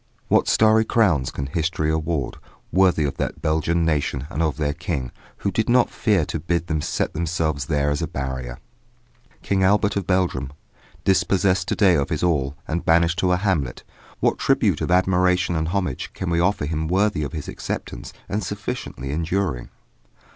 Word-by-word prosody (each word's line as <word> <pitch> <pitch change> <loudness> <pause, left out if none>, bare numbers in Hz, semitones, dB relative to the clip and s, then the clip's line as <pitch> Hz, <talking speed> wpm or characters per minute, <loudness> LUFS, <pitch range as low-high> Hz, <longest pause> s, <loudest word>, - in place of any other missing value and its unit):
What - - +3
starry 110 0 +4
crowns 95 - +2
can 70 - -4
history 80 +1 -1
award 80 -3 -2 0.3
worthy 90 -4 +3
of 70 - -2
that - - -3
Belgian 80 +2 +1
nation 70 -4 0
and 80 - -2
of 80 -3 0
their 75 -2 0
King, 70 -4 -3 0.3
who 100 - +2
did 110 +5 0
not 120 0 +4
fear 100 -8 +1
to 80 - -4
bid 85 +2 -1
them 80 -3 -1
set - - -2
themselves 80 -4 -1
there 75 -2 +1
as 75 - -1
a - - -1
barrier. 65 -2 -4 0.9
King 95 -1 +1
Albert 100 +2 +3
of 100 -3 -2
Belgium, 85 -8 0 0.5
dispossessed 95 -1 +2
to - - 0
day 100 -4 +5
of 70 0 +1
his 80 -2 -2
all 70 -5 +1
and 85 +2 -2
banished 85 +2 +3
to 90 -1 +2
a 90 - +3
hamlet 90 -10 -1 0.4
what - - +2
tribute - - +2
of - - -1
admiration 90 -1 +2
and 80 0 0
homage 90 -7 -2
can 90 -2 -3
we 85 - +2
offer 90 -3 +1
him 80 +1 -2
worthy 95 0 +1
of 70 - -5
his 75 -3 -5
acceptance - - -5 0.2
and 105 +2 -2
sufficiently 70 -5 -5
enduring? 85 -3 -1
85 Hz, 175 wpm, -23 LUFS, 75-95 Hz, 0.9 s, day